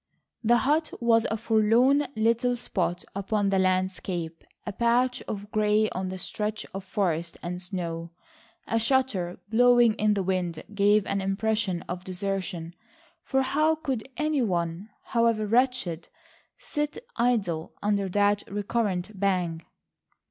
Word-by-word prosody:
The 240 +2 +5
hut 305 +5 +1
was 230 -1 +3
a 220 - -1
forlorn 230 +6 +3
little 230 +3 +2
spot 180 -6 -2
upon 200 0 0
the 195 - +3
landscape, 185 -3 -1 0.2
a - - -4
patch 245 +3 +2
of 205 0 -6
grey 215 0 +2
on 185 0 -3
the 185 - -5
stretch 210 +3 -3
of 195 0 -5
forest 175 -4 -1
and 180 +1 -4
snow. 170 -2 -4 0.6
A 225 - 0
shutter 225 -8 +1
blowing 240 0 +5
in 215 -1 +2
the 195 - 0
wind 180 -3 -2
gave 205 0 +4
an 200 - -1
impression 195 -2 -1
of 180 +1 -6
desertion, 185 -2 -4 0.5
for 265 -5 +1
how 305 +4 +2
could 265 -6 -4
any 305 -2 +1
one, 175 -1 -1
however 230 -2 +1
wretched, 230 -7 +1 0.5
sit 295 -1 -3 0.2
idle 205 -10 0
under 200 -2 +1
that 205 +2 +2
recurrent 205 -2 -2
bang? 180 -4 0
205 Hz, 135 wpm, -27 LUFS, 185-235 Hz, 0.6 s, The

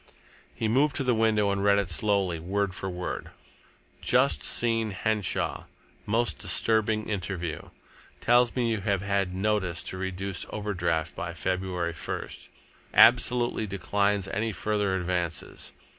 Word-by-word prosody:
He 110 - -1
moved 140 +6 +2
to 140 - +1
the 125 -1 +2
window 110 -2 +2
and 100 0 -1
read 100 0 +5
it 100 -2 +1
slowly, 95 -2 +1
word 95 +3 -1
for 95 +1 -4
word: 90 0 -5 0.7
"Just 130 +3 +3
seen 115 -2 +2
Henshaw. 105 0 -1 0.4
Most 115 +3 0
disturbing 110 +2 +1
interview. 90 -5 -4 0.5
Tells 120 0 +3
me 120 -2 +1
you 110 -3 -1
have 100 -1 0
had 100 -2 0
notice 95 -3 0
to 95 - -5
reduce 95 0 -3
overdraft 85 -7 -2
by 90 -3 -5
February 90 -2 -2
1st. - - -6 0.5
Absolutely 120 -2 +5
declines 100 +1 0
any 110 +3 -1
further 105 -2 -1
advances. 90 -2 -3
100 Hz, 130 wpm, -27 LUFS, 90-110 Hz, 0.7 s, read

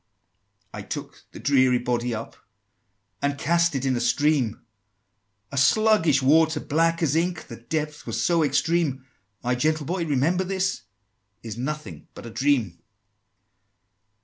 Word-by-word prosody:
XXI. - - -48
"I - - -6
took - - -7
the - - -10
dreary 130 -3 +3
body 120 0 -1
up, 110 - -7 0.9
And 140 0 0
cast 170 +2 +1
it 135 0 -2
in 130 -1 +1
a 120 - -1
stream, 145 -6 +1 0.9
A 140 - -6
sluggish 170 -7 +3
water, 160 +4 +4
black 165 +2 +1
as 150 -2 +1
ink, 170 0 -1
The 115 - -10
depth 150 +4 -4
was - - -2
so 170 -2 +2
extreme: 145 -2 0 0.4
My 125 +1 +1
gentle 155 +4 0
Boy, 175 +2 -2
remember 160 +5 +1
this 190 0 -2 0.6
Is 115 -2 -6
nothing 125 - -6
but - - -10
a 115 - -8
dream!" 115 -8 0
145 Hz, 145 wpm, -24 LUFS, 125-165 Hz, 0.9 s, water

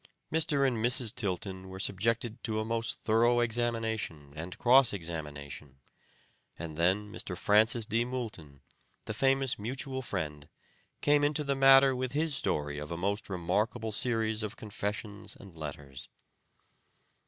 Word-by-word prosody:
Mr. 145 -4 +3
and 125 -3 0
Mrs. 120 -2 +2
Tilton 95 -3 -3
were 95 - -8
subjected 110 +4 0
to 110 -2 -1
a 110 - -2
most 115 0 -2
thorough 120 +2 +3
examination 115 -10 -1
and 85 +3 -6
cross 130 0 +5
examination, 75 -6 -7 0.8
and 80 -2 -6
then 95 +6 +1
Mr. 90 -3 -5
Francis 110 +4 +3
D. 115 +1 +1
Moulton, 110 - -6 0.4
the - - -4
famous 135 +1 +1
mutual 130 +4 -3
friend, 75 - -4 0.5
came 145 0 +4
into 150 +1 +2
the 140 -1 0
matter 135 0 +7
with 130 0 -3
his 155 +1 +1
story 75 - 0
of 75 +1 -7
a 85 - -3
most 100 +4 -1
remarkable 100 +5 -1
series 110 -1 0
of 105 +1 -4
confessions 105 0 -5
and 95 -4 -13
letters. 70 -3 -8
110 Hz, 140 wpm, -30 LUFS, 90-120 Hz, 0.8 s, matter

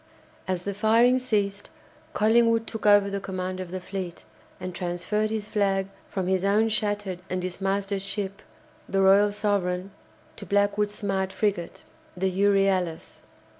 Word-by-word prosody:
As 185 -1 -2
the 200 - -3
firing 230 +5 +4
ceased, 205 -5 -1 0.4
Collingwood 230 +1 +3
took 220 -2 -4
over 205 -1 +6
the 200 0 -2
command 185 -1 -4
of 185 -2 -5
the 185 +1 -4
fleet, 185 -2 -6 0.3
and 185 0 -5
transferred 180 +5 -1
his 215 -1 -3
flag 195 -2 0 0.2
from 190 -2 -2
his 185 0 +1
own 210 +3 +3
shattered 205 -4 -1
and 185 - -1
dismasted 195 +2 -2
ship, 200 0 -3 0.5
the 195 0 +2
"Royal 200 +2 +5
Sovereign," 195 -3 -1 0.5
to - - -8
Blackwood's 205 +1 +1
smart 190 -2 -1
frigate, 200 -6 -2 0.3
the 190 +1 0
"Euryalus." 195 -3 +1
200 Hz, 140 wpm, -26 LUFS, 185-210 Hz, 0.5 s, over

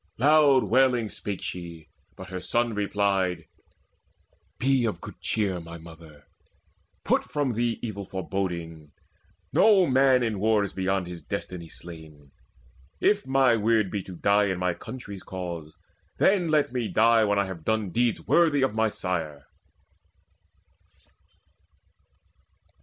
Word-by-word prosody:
Loud 145 0 +5
wailing 125 -2 +2
spake 100 -2 -6
she; 85 -3 -7 0.3
but 95 -1 -10
her 90 -1 -5
son 120 +2 0
replied: 100 -4 0 1.1
"Be 130 +2 +2
of 110 -3 -1
good - - -10
cheer, 100 -5 -1
my 85 0 -9
mother; 80 -3 -14 0.8
put - - +2
from 145 -4 -2
thee 120 +1 -1
Evil 105 -4 -4
foreboding. 85 -5 -5 0.6
No 205 -4 +5
man 130 -2 +4
is - - +1
in 105 - -5
war 105 0 +2
Beyond 95 -1 -1
his 85 -1 -8
destiny 85 -3 -6
slain. 80 -5 -11 0.7
If 205 -5 +2
my 135 -3 +4
weird 110 -2 +1
be 100 - -2
To 95 - -10
die 100 +4 +3
in 95 -2 -1
my 90 0 0
country's 100 -3 -9
cause, 85 -5 -7 0.4
then 190 -3 +3
let 150 -5 +1
me 120 -3 -1
die 115 +1 +4
When 100 -1 +1
I 100 - +2
have 95 -4 -8
done 110 -2 -1
deeds 120 +3 0
worthy 155 -5 +3
of 135 - +1
my 110 0 +1
sire." 80 -8 -4
100 Hz, 135 wpm, -26 LUFS, 90-120 Hz, 1.1 s, Loud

